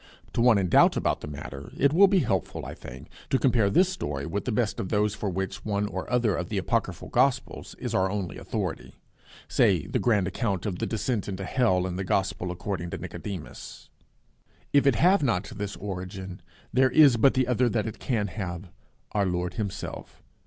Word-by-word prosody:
To - - 0
one 120 -3 +6
in 95 -2 +1
doubt - - +5
about - - 0
the - - -6
matter 70 -1 -8
it 140 +1 +3
will 195 +4 +7
be 190 -2 +3
helpful, 95 - -2
I - - -6
think, 65 +1 -11 0.2
to 135 - +3
compare 120 -6 +3
this 180 - +4
story 75 - -4
with 100 +5 -3
the 125 - -1
best 110 -1 0
of 95 - -3
those 105 -1 +1
for 105 -1 -3
which 95 +1 -4
one 105 -1 0
or 105 - -5
other 120 -6 +2
of 90 - -4
the 105 - -2
apocryphal 95 -3 -1
gospels 130 +1 0
is - - -4
our 95 0 +2
only 100 -3 -4
authority - - -4 0.5
say - - +3
the - - -1
grand 105 -6 +2
account 100 -1 -2
of 95 -4 -3
the - - -1
Descent 110 0 -2
into 95 0 -4
Hell 95 -6 +2
in 90 -1 -3
the 95 - -2
Gospel 95 -1 -1
according 90 -1 -4
to - - -4
Nicodemus. 95 -6 -8 0.8
If 140 -1 +5
it 135 - +5
have 185 - +4
not 105 -9 0
this 100 -1 -4
origin, 95 -1 -6 0.3
there 130 0 +4
is 140 -1 +6
but 130 +4 +4
the 130 -1 +2
other 125 0 +2
that 110 -1 0
it 110 - -6
can 115 -6 0
have 90 -2 -5 0.4
Our 100 -2 +1
Lord 90 0 -2
himself. 100 -1 -6
100 Hz, 200 wpm, -27 LUFS, 90-125 Hz, 0.8 s, will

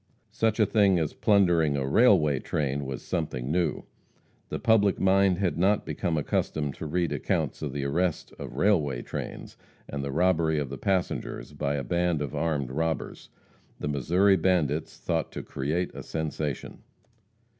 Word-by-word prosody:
Such 110 0 0
a 110 - +6
thing 100 -3 +3
as 80 -3 -1
plundering 85 -8 +3
a 70 - -1
railway 75 - +4
train 70 -1 -2
was 65 -2 -5
something 75 -7 -3
new. 90 +1 0 0.7
The - - -3
public 105 -4 +3
mind 95 -1 +4
had 90 -3 -1
not 100 +3 +2
become 85 -4 -2
accustomed 75 -1 -1
to 80 - -5
read 85 +2 0
accounts - - -1
of 75 - -3
the 70 +1 -3
arrest 85 +4 -1
of - - -7
railway 75 -11 +2
trains - - -7 0.3
and 70 -1 -4
the 70 - -3
robbery 80 0 +2
of 70 -3 -2
the 70 - -6
passengers 95 -5 -2
by 75 -1 -1
a 70 - -2
band 85 +4 0
of 70 - -6
armed 75 -6 -1
robbers. 80 +2 -3 0.5
The 75 - -3
Missouri 90 +8 +3
bandits 80 -4 0
thought 80 -1 -2
to - - -5
create 80 +7 -2
a - - -7
sensation. 80 -2 -4
80 Hz, 160 wpm, -27 LUFS, 70-95 Hz, 0.7 s, a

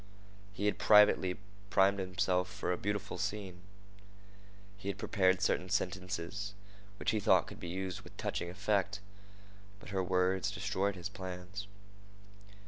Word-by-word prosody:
He 100 +1 -3
had 105 - +1
privately 105 -3 +6 0.3
primed 100 0 +4
himself 90 -1 0
for - - -2
a - - +2
beautiful 100 0 -3
scene. 95 -2 -3 1.1
He 100 -1 -10
had 100 - -2
prepared 95 -3 +2
certain 90 0 +1
sentences 95 +1 -2 0.4
which - - 0
he 110 - +1
thought - - +4
could - - -10
be - - -6
used 95 0 -3
with - - -15
touching 85 - -2
effect. 100 +1 0 0.8
But 105 - -11
her 95 -1 0
words 95 +1 +2
destroyed 100 0 -1
his 90 -2 -4
plans. 95 0 -7
95 Hz, 135 wpm, -33 LUFS, 90-100 Hz, 1.1 s, privately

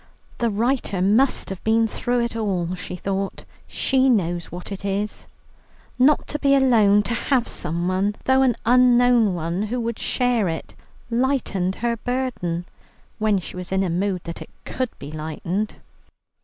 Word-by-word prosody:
The 235 - +2
writer 225 -2 0
must 215 +9 +2
have 190 - -7
been 225 +1 +3
through 240 +2 -1
it 235 0 -2
all, 185 -6 -1
she 180 0 -6
thought; 195 +1 -3 0.2
she 265 0 +2
knows 175 -7 +1
what 180 +3 -8
it 195 -1 -6
is. 200 +1 -3 0.7
Not 275 +3 +4
to 295 - -2
be 275 -1 +4
alone, 220 -6 +5
to 235 - -2
have 250 0 +1
someone, 185 +4 -1
though 265 0 +4
an 255 -4 +3
unknown 245 -3 +5
one, 170 +3 -2
who 245 +3 -2
could 235 -1 -3
share 245 -5 +1
it, 160 - -5 0.4
lightened 230 -7 0
her 235 -1 +1
burden, 225 -9 -2 0.5
when 215 -2 +2
she 180 - -7
was 180 0 -6
in 190 0 +2
a 180 - -1
mood 185 +1 -1
that 170 - -7
it - - -9 0.2
should 255 -2 -2
be 145 - -8
lightened. 160 +7 -3
210 Hz, 160 wpm, -23 LUFS, 180-245 Hz, 0.7 s, alone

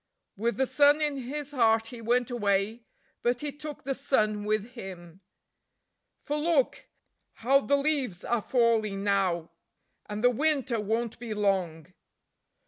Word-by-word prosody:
With 230 +4 -1
the 265 - +2
sun 290 +3 +4
in 295 -2 0
his 280 +3 -5
heart 225 -4 +3
he 240 -1 -9
went 245 +2 +1
away, 210 0 0 0.4
but 240 0 0
he 295 -1 -2
took 295 +1 -8
the 270 - -1
sun 215 -6 0
with 215 +2 -1
him. 185 -6 -10 1.0
For 295 - -2
look! 300 -3 +1 0.5
How 270 +4 +3
the 280 +1 +2
leaves 275 - -1
are 240 -2 0
falling 220 -5 +1
now, 185 -5 0 0.6
and 210 +2 -4
the 245 - +6
winter 270 -3 0
won't 225 +2 -2
be 230 -3 -5
long. 185 -5 -1
235 Hz, 140 wpm, -28 LUFS, 205-270 Hz, 1.0 s, the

